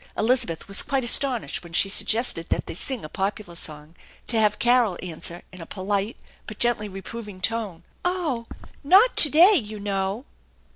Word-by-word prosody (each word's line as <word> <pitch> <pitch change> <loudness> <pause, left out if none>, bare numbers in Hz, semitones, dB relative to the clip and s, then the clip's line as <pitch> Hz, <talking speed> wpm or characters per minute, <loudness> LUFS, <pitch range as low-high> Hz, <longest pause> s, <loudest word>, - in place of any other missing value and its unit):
Elizabeth 230 -7 -1
was 200 +1 +6
quite 270 -1 -2
astonished 245 -2 +1
when 170 -1 -14
she 195 - +5
suggested 210 -3 +1
that - - -2
they - - -7
sing 245 - -4
a - - -6
popular 195 +1 -4
song 155 -1 -6 0.3
to 230 - +1
have 210 -1 +2
Carol 240 -6 +2
answer 170 0 -7
in 185 -2 -12
a 165 - -10
polite 200 +3 -3 0.3
but 215 - -8
gently 235 -3 -1
reproving 200 +1 -9
tone, 205 -5 -2
" - - -37
Oh, 325 -11 -2 0.4
not 390 - +5
to 300 - +9
day, 345 +8 +6
you 215 - -1
know." 200 +4 -3
215 Hz, 175 wpm, -23 LUFS, 190-245 Hz, 0.4 s, to